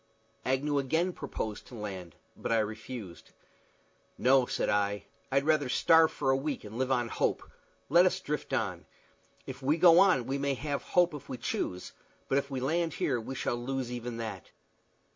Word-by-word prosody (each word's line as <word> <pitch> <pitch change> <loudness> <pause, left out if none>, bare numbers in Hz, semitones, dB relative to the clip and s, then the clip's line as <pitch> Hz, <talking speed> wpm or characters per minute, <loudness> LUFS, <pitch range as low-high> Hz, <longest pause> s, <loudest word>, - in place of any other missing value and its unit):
Agnew 140 +3 +1
again 160 +7 0
proposed 110 -9 -5
to 125 - -11
land, 95 -6 -7 0.2
but - - -4
I 115 - +4
refused. 110 -3 -5 0.8
"No," 130 0 +4
I - - -13
said; - - -1
"I'd 105 +6 -1
rather 150 -3 +2
starve 160 +4 +5
for 135 -2 0
a - - +3
week, 140 +1 -3
and 110 +3 -8
live 130 0 0
on 120 -2 +1
hope. - - -1 0.4
Let 175 +5 +6
us 185 +1 0
drift 150 -5 -4
on. - - -2 0.6
If - - -8
we 145 +5 +2
go 170 0 +7
on 185 -11 +4
we 135 +2 -2
may 140 0 0
have 140 +1 -3
hope 175 -2 +2
if 145 - -9
we 130 - -4
choose, 90 -5 -3 0.3
but 135 - +3
if 140 - -6
we 135 -2 -3
land 165 +5 0
here 125 -4 0
we 130 +4 -6
shall 125 - -1
lose 125 +1 -3
even 120 -1 -5
that. 110 -6 -6
135 Hz, 180 wpm, -30 LUFS, 115-150 Hz, 0.8 s, go